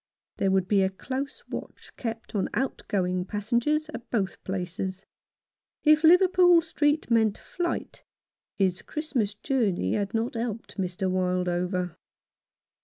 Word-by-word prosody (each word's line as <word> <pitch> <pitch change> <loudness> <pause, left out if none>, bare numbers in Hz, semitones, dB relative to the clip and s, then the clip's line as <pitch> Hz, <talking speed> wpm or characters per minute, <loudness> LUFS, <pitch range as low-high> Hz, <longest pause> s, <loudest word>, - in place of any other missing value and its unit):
There 195 - +2
would 190 -1 +2
be 200 -1 +3
a 190 - +3
close 260 +8 -5
watch - - -8
kept 230 -1 -5
on 200 -3 0
out 265 +2 -1
going 180 -2 0
passengers 235 +10 0
at 235 - -8
both 200 -5 -2
places. 190 +1 -4 0.8
If 305 +1 +5
Liverpool 360 +1 +7
Street 295 -4 0
meant 220 -3 +3
flight, 345 -1 -4 0.5
his 190 -2 +1
Christmas 255 -10 -2
journey 210 - 0
had 200 +1 -1
not 225 +2 0
helped 230 -2 -4
Mr. 185 0 -1
Wild 185 -1 0
over. 180 0 -1
210 Hz, 130 wpm, -27 LUFS, 185-265 Hz, 0.8 s, Liverpool